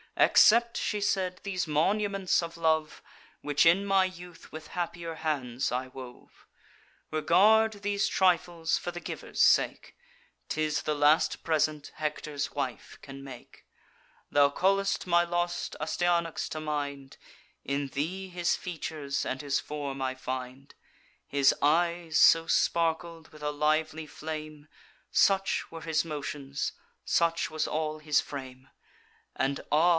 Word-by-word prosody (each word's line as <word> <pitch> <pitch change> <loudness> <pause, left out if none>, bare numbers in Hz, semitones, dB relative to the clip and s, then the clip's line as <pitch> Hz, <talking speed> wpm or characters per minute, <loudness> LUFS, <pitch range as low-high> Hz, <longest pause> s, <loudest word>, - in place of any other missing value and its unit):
'Accept,' 235 +1 +5
she 210 - -1
said, 185 -2 0
'these 185 -4 -2
monuments 195 +4 +1
of 170 0 -7
love, 160 -2 0 0.4
Which 145 +1 +2
in 185 +4 +4
my 195 -1 +4
youth 180 -2 -10
with 155 0 -9
happier 170 -1 -4
hands 135 -6 -2
I 125 +1 -2
wove: 125 -1 -12 0.7
Regard 205 +7 +4
these 205 0 +1
trifles 175 -3 +1
for 175 - -4
the 175 - -7
giver's - - -5
sake; - - +3 0.5
'Tis 155 -1 -1
the 150 - -1
last 150 +2 +3
present 155 -2 0
Hector's 150 -2 -3
wife 130 -6 -4
can 135 0 -10
make. 130 -3 -12 0.7
Thou 145 0 +5
call'st 195 +4 +1
my 175 -1 +4
lost 175 0 -2
Astyanax 170 +1 0
to 155 - -5
mind; 145 -3 -4 0.5
In 140 +1 -2
thee 170 +8 -3
his 175 -1 0
features 155 -5 -4
and 130 - -3
his 140 -2 0
form 140 -2 -5
I 130 0 -1
find: 130 +1 -6 0.5
His 140 -1 +4
eyes 170 +2 +2
so 165 0 +6
sparkled 165 0 0
with 155 -1 -14
a 150 - 0
lively 155 +1 0
flame; 155 -1 -7 0.4
Such 195 0 +2
were 165 0 -8
his 160 -2 0
motions; 145 -3 -4 0.3
such 165 0 +1
was 155 0 -2
all 155 0 -2
his 150 -1 +2
frame; 130 -2 -7 0.7
And 135 +1 -1
ah! 160 +4 +5
155 Hz, 130 wpm, -29 LUFS, 145-175 Hz, 0.7 s, so